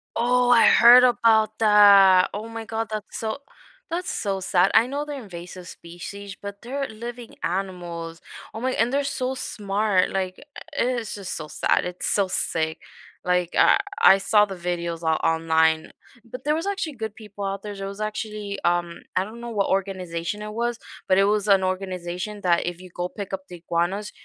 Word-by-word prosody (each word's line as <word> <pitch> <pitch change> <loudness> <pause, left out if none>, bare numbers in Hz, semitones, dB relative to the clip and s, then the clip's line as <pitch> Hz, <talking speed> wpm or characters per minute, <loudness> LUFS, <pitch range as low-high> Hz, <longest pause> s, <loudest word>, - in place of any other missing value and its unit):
Oh, 245 +1 +2
I 240 -2 +6
heard 245 +1 +8
about 220 -3 +3
that. 200 -3 +7
Oh 215 +2 -5
my 225 0 -7
god, 225 0 -3
that's 215 -1 -5
so 220 +2 -3 0.5
that's 350 +2 -3
so 195 -2 -2
sad. 185 0 +2
I 230 - +6
know 285 +2 -3
they're 285 -3 -6
invasive 180 -1 -10
species, 185 +3 -9
but 200 0 -8
they're 270 +3 -4
living 235 +2 -9
animals. 175 -3 -4 0.3
Oh 220 - -6
my 260 0 0
and 240 +2 +1
they're 280 +1 +1
so 260 -1 -2
smart, 205 -4 0
like 185 -1 -2
e - - -14 0.4
i - - +4 0.2
it's 220 -2 -6
just 195 -2 -5
so 155 -1 -7
sad. - - +1
It's 180 0 -4
so 200 -2 +2
sick, 160 -3 -1 0.4
like, 180 -1 +1
I - - +6 0.2
I 195 - +8
saw 210 +1 +3
the 195 -2 -7
videos 170 -1 -4
o 160 0 +2
online. 160 -1 +2 0.3
But 250 +2 -9
there 300 +1 +1
was 330 +4 -3
actually 380 -8 -3
good 220 -2 -5
people 210 -3 -9
out 195 0 -3
there. 205 -1 -6
There 195 0 -5
was 200 +2 -7
actually, 210 -1 -4
um 175 -1 0
I 185 - +2
don't 220 +4 -10
know 235 - -6
what 200 -3 0
organization 185 0 -2
it 210 0 -6
was, 235 +1 -2 0.3
but 185 - +3
it 195 - +5
was 210 0 +1
an 195 -1 +4
organization 185 +2 -4
that 170 -2 +2
if 175 0 -5
you 185 - -12
go 175 +1 -4
pick 200 -2 -7
up 190 0 -5
the 180 - -10
iguanas, 175 +5 -2
200 Hz, 195 wpm, -24 LUFS, 180-225 Hz, 0.5 s, heard